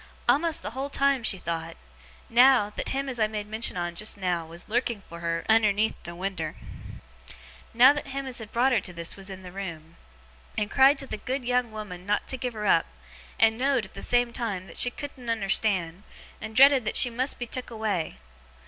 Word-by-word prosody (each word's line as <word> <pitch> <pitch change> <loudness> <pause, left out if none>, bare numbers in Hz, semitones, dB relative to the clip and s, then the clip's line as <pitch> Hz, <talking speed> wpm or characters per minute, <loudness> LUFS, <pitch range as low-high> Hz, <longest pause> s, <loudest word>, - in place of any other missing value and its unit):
A'most 310 +6 +2
the - - -4
whole 265 +4 -4
time, 275 -2 +2
she 220 -3 +2
thowt, 165 -2 -4 0.5
now, 245 -3 +5
that - - -5
him 275 +1 -2
as 255 -3 -4
I 215 - +3
made 210 -1 -4
mention 215 -2 -2
on 175 -1 -2
just 215 +4 -3
now 175 -4 -1
was 170 +2 -9
lurking 235 -2 -1
for 170 - -9
her 165 0 -2
unnerneath 220 -1 +3
the 170 0 -7
winder; 175 -4 -4 1.2
now 255 +4 +7
that 295 -1 -5
him 275 0 -4
as 255 -2 -5
had 220 -2 -9
brought 250 +3 +2
her 235 -5 +3
to 180 - -6
this 170 -1 -4
was 195 0 -7
in 190 -1 -8
the 180 - -9
room, 170 -4 -8 0.6
and 210 0 -1
cried 270 +2 +6
to 275 - -1
the 240 - -5
good 255 +3 -3
young 245 -1 +1
woman 200 -4 -8
not 205 0 0
to 260 - -2
give 250 0 -3
her 210 -1 -5
up, 165 -4 +4 0.5
and 225 0 +4
know'd, 265 -4 +1
at 190 - -16
the - - -8
same 245 -1 +1
time, 205 -7 -3
that - - -3
she 245 - +5
couldn't 255 -2 -8
unnerstand, 195 -5 +1 0.4
and 220 0 -7
dreaded 275 -1 +7
that 215 - -1
she 245 - +5
must 255 +4 -2
be 245 - -4
took 250 +2 -4
away. 215 -8 -2
220 Hz, 210 wpm, -26 LUFS, 190-250 Hz, 1.2 s, now